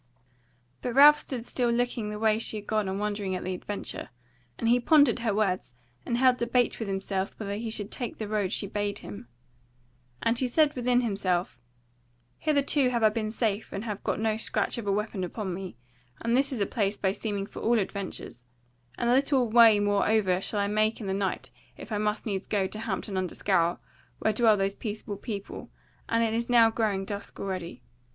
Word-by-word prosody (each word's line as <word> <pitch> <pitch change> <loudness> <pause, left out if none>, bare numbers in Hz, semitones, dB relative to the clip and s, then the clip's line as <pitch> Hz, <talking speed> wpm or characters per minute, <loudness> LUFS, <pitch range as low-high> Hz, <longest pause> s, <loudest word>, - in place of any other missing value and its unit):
But 245 -1 -3
Ralph 295 +2 +9
stood 245 -4 -5
still 245 -1 0
looking 235 -2 0
the 210 - -5
way 220 0 +2
she 225 - 0
had 205 - -8
gone 215 -2 0
and 190 +1 -3
wondering 205 -2 -2
at 180 - -4
the 185 - -2
adventure; 200 +3 -5 0.5
and 230 - -2
he 240 +2 +5
pondered 285 -1 +4
her 230 -2 0
words 195 - -1 0.3
and 235 - 0
held 255 0 +4
debate 240 0 +1
with 225 - -3
himself 195 0 -3
whether 200 -2 -3
he 225 +2 -4
should 215 -1 -3
take 240 -5 -4
the 215 - -4
road 205 -3 -1
she 210 - 0
bade 205 0 -2
him. 105 +3 -9 1.0
And 230 +1 +2
he 255 - +1
said 300 +4 +3
within 250 0 +2
himself: 195 -6 -1 0.8
"Hitherto 285 -3 +2
have 235 -2 -1
I 215 - +7
been 215 0 -2
safe 215 -1 -2
and 195 - -4
have 210 -4 -5
got - - -1
no 220 -1 0
scratch 225 - -1
of 215 - -6
a - - +2
weapon 205 -1 -2
upon 190 +1 -4
me, 185 -6 -7 0.4
and 230 +1 0
this 275 +2 +2
is 245 -6 -3
a - - +3
place 205 -2 -1
by 190 - +1
seeming 200 -1 -3
for - - -10
all 235 +1 +3
adventures; 195 - -4 0.5
and 235 - -1
little 265 -2 +3
way 225 -2 +7
moreover 205 -2 +2
shall 205 +1 -1
I - - +1
make 215 +2 +1
in 220 - -6
the 190 - -1
night 195 -1 -2 0.3
if - - -10
I 210 - 0
must 210 +1 -1
needs 195 -3 -3
go 200 -3 +1
to 215 +3 -5
Hampton 200 -2 -3
under 185 -2 -2
Scaur, 175 -3 +1 0.4
where 220 - +1
dwell 220 -1 +4
those 195 0 0
peaceable 210 -1 -5
people; 200 -2 -6 0.4
and 230 0 +2
it 225 -1 0
is 235 +1 -2
now 230 -2 +6
growing 210 -4 0
dusk 200 0 -6
already. 185 - -5
215 Hz, 205 wpm, -28 LUFS, 195-235 Hz, 1.0 s, Ralph